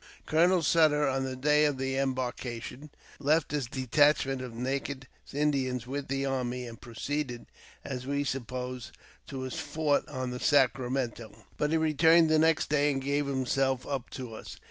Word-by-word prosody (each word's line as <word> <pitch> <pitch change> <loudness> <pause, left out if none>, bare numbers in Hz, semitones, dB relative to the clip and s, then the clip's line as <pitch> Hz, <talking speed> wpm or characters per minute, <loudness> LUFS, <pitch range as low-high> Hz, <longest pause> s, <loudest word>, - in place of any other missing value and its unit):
Colonel 170 +2 +3
Sutter, 150 -2 +4
on 135 0 0
the 130 0 -4
day 150 +3 +3
of 145 -3 0
embarkation, 130 0 -3 0.3
left 150 +2 +2
his 145 -5 -1
detach 140 +3 +3
ment 135 -1 -3
of 125 -2 -6
naked 135 +2 -3 0.2
Indians 135 -4 0
with 140 +2 -4
the 135 +1 -1
army, 125 -2 -2
and 115 -1 -10
proceeded, 125 +2 -4 0.4
as 130 -1 -5
we 140 0 0
supposed, 125 -2 -4 0.3
to 135 -1 -6
his 130 -1 -4
fort 150 0 0
on 130 -3 -3
the 125 - -5
Sacramento; 125 -6 0
but 150 - 0
he 160 - +2
returned 160 +1 +4
the 155 - +5
next 160 0 +3
day. 145 0 +2
and 135 - -1
gave 140 +1 -1
himself 130 -1 0
up 135 -4 -4
to 125 -4 -7
us. - - -9
135 Hz, 165 wpm, -29 LUFS, 125-150 Hz, 0.4 s, the